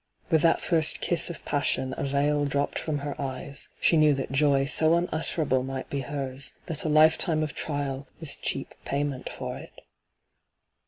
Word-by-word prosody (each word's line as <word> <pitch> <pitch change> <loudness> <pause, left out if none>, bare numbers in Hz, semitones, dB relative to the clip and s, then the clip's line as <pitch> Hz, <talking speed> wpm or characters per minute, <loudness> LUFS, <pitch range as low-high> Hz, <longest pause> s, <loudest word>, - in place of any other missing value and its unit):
With 160 -2 +4
that 165 - +3
first 160 -3 +2
kiss 175 - +1
of 170 - -8
passion 130 -2 0
a - - -4
veil 145 +1 +1
dropped 140 0 -1
from 155 -2 -2
her 145 - -2
eyes 140 +1 -4
— - - -35
she 165 - +4
knew 155 -2 +5
that 135 - -4
joy 135 0 +3
so 155 +3 +4
unutterable 155 -5 0
might 130 0 -5
be 140 - -1
hers, 135 0 -3
that 160 -3 -1
a 155 - -1
lifetime 155 +1 +4
of 150 - -3
trial 140 -2 -3
was 160 -4 -2
cheap - - -3
payment 140 -2 -2
for - - -5
it. - - -13
145 Hz, 175 wpm, -27 LUFS, 135-155 Hz, -, knew